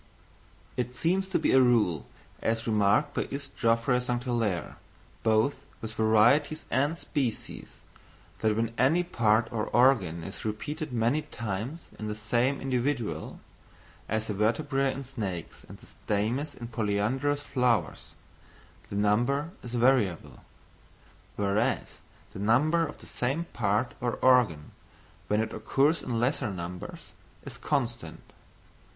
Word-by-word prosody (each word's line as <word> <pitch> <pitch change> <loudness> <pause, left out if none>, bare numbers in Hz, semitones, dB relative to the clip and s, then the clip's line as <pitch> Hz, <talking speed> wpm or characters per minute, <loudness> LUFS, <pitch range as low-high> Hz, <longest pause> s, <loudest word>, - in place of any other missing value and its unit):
_ - - -29 0.7
It 125 0 -2
seems 190 +8 +1
to 190 - +2
be - - +1
a 130 - +6
rule, 115 - +2 0.3
as 115 0 0
remarked 105 -3 +2
by - - -1
Is. 140 +1 -5
Geoffroy 115 +1 +2
St. 125 0 -2
Hilaire, 115 -8 -1 0.4
both 110 +5 +2 0.2
with 110 -1 -6
varieties 120 +9 +3
and 145 +5 +1
species, 135 -9 -3 0.7
that 110 -1 +2
when 115 +1 -1
any 155 +8 +4
part 115 -9 +2
or 110 -2 -1
organ 105 -11 +3
is 95 - -8
repeated 145 +8 -4
many 120 +5 +1
times 115 - -5
in 110 - -4
the 105 - -3
same 120 +6 +1
individual 130 -2 -2 0.7
(as 110 0 0
the 105 - -3
vertebræ 135 +6 +1
in 140 - -6
snakes, 105 - -6
and - - -10
the - - -18
stamens 120 +9 -2
in 120 -1 -8
polyandrous 120 +6 0
flowers) 120 - 0 0.8
the - - -5
number 120 +10 +1
is 120 0 -6
variable; 120 -7 +1 0.9
whereas 105 +5 0 0.3
the - - -7
number 150 +11 +3
of - - -11
the - - -12
same 135 +7 -1
part 110 +2 0
or 120 -1 0
organ, 120 -13 +3 0.6
when 105 - +2
it 110 - -3
occurs 140 +8 +2
in 120 -3 -2
lesser 125 0 0
numbers, 90 -1 -7 0.3
is - - -8
constant. 120 - -2
120 Hz, 135 wpm, -28 LUFS, 105-135 Hz, 0.9 s, a